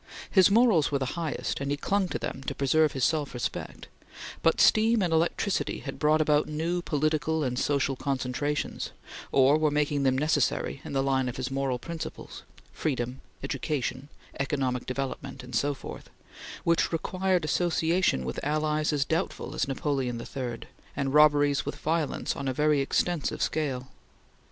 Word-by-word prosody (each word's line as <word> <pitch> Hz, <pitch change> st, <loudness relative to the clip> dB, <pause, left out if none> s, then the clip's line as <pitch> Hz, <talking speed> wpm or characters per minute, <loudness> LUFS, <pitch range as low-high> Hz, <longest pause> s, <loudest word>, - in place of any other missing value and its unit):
His 190 Hz, -1 st, +6 dB
morals 205 Hz, -9 st, +4 dB
were 140 Hz, -, +2 dB
the 130 Hz, -1 st, -2 dB
highest, 165 Hz, -3 st, -2 dB
and 140 Hz, -, -2 dB
he 145 Hz, -, 0 dB
clung 195 Hz, +5 st, 0 dB
to -, -, -3 dB
them 135 Hz, -, -5 dB
to -, -, -2 dB
preserve 150 Hz, +2 st, +3 dB
his 135 Hz, -, -2 dB
self 150 Hz, -2 st, +1 dB
respect; 120 Hz, -, -4 dB, 0.5 s
but 165 Hz, -, +3 dB
steam 220 Hz, -1 st, +5 dB
and 170 Hz, -2 st, 0 dB
electricity 170 Hz, +4 st, 0 dB
had 135 Hz, -, -7 dB
brought 155 Hz, +1 st, +3 dB
about 150 Hz, -1 st, +3 dB
new 165 Hz, +4 st, -1 dB
political 155 Hz, 0 st, 0 dB
and 125 Hz, -2 st, -1 dB
social 140 Hz, -1 st, +1 dB
concentrations, 140 Hz, +2 st, -2 dB, 0.4 s
or 140 Hz, +3 st, +5 dB
were 155 Hz, -1 st, +3 dB
making 145 Hz, -1 st, +1 dB
them 130 Hz, -1 st, +2 dB
necessary 145 Hz, -2 st, 0 dB
in -, -, -7 dB
the 135 Hz, -1 st, +1 dB
line 130 Hz, -2 st, +1 dB
of 120 Hz, -, -6 dB
his 130 Hz, 0 st, -3 dB
moral 135 Hz, -2 st, 0 dB
principles 165 Hz, +5 st, -7 dB, 0.3 s
freedom, 130 Hz, -3 st, -2 dB, 0.2 s
education, 135 Hz, -1 st, -3 dB, 0.3 s
economic 135 Hz, -3 st, -1 dB
development 135 Hz, 0 st, -4 dB
and 125 Hz, -1 st, -7 dB
so 145 Hz, +4 st, +1 dB
forth -, -, -9 dB, 0.5 s
which 170 Hz, 0 st, +2 dB
required 185 Hz, +1 st, 0 dB
association 165 Hz, -, +1 dB
with 65 Hz, -, -4 dB
allies 155 Hz, +1 st, 0 dB
as 145 Hz, -1 st, +1 dB
doubtful 165 Hz, +5 st, -2 dB
as -, -, -1 dB
Napoleon 135 Hz, -3 st, -1 dB
III, 120 Hz, -1 st, -5 dB, 0.3 s
and 135 Hz, -1 st, -1 dB
robberies 145 Hz, -2 st, +5 dB
with -, -, -4 dB
violence 160 Hz, -2 st, -1 dB
on 140 Hz, -, -4 dB
a 130 Hz, -, 0 dB
very 150 Hz, +1 st, +2 dB
extensive 160 Hz, +3 st, 0 dB
scale. 135 Hz, -4 st, -2 dB
145 Hz, 160 wpm, -28 LUFS, 135-160 Hz, 0.5 s, His